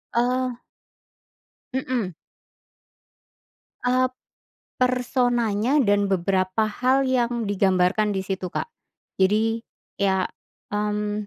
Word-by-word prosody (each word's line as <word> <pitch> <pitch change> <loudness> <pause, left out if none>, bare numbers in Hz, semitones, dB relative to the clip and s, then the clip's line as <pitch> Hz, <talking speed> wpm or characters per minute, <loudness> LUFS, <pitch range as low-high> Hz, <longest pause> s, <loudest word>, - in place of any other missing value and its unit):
Eee 250 +1 +1 1.1
Mhm. 250 -7 -1 1.7
Eee, 255 +1 +3
p - - -37 0.7
personanya 245 -2 +1
dan 205 -2 +3
beberapa 190 +2 +1
hal 255 +5 +2
yang 240 -2 +1
digambarkan 195 +1 +2
di 190 - -1
situ, 190 -1 -3
Kak. 470 - -4 0.5
Jadi, 220 +4 +3 0.4
iya, 190 -1 +2 0.5
mmm, 210 0 -1
215 Hz, 85 wpm, -24 LUFS, 195-250 Hz, 1.7 s, Eee